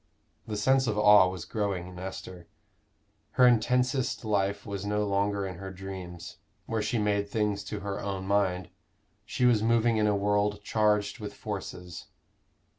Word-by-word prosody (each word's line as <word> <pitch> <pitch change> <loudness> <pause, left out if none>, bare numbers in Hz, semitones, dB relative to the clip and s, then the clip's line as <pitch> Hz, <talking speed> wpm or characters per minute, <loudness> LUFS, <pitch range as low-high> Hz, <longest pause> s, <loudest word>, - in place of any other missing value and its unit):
The 105 -1 -3
sense 130 +4 +3
of 105 -2 -1
awe 105 -3 +7
was 90 -2 -6
growing 100 -3 -2
in 90 0 -10
Esther. 90 -2 -8 0.9
Her 125 - +5
intensest 125 +1 +2
life 100 -2 0
was 100 -1 -5
no 105 +1 0
longer 100 0 0
in 90 -3 -6
her 95 0 -6
dreams, 90 -2 -8 0.3
where 115 -1 -2
she 110 +3 -1
made 100 -1 0
things 105 -1 -1
to 105 -1 -5
her 100 0 -4
own 95 -2 -4
mind: 95 -3 0 0.5
she 125 +3 0
was 120 -4 +4
moving 115 0 +3
in 105 -1 +2
a 105 - +2
world 105 +1 0
charged 105 +1 +1
with 105 -2 -7
forces. 90 -4 -7
100 Hz, 160 wpm, -28 LUFS, 95-105 Hz, 0.9 s, awe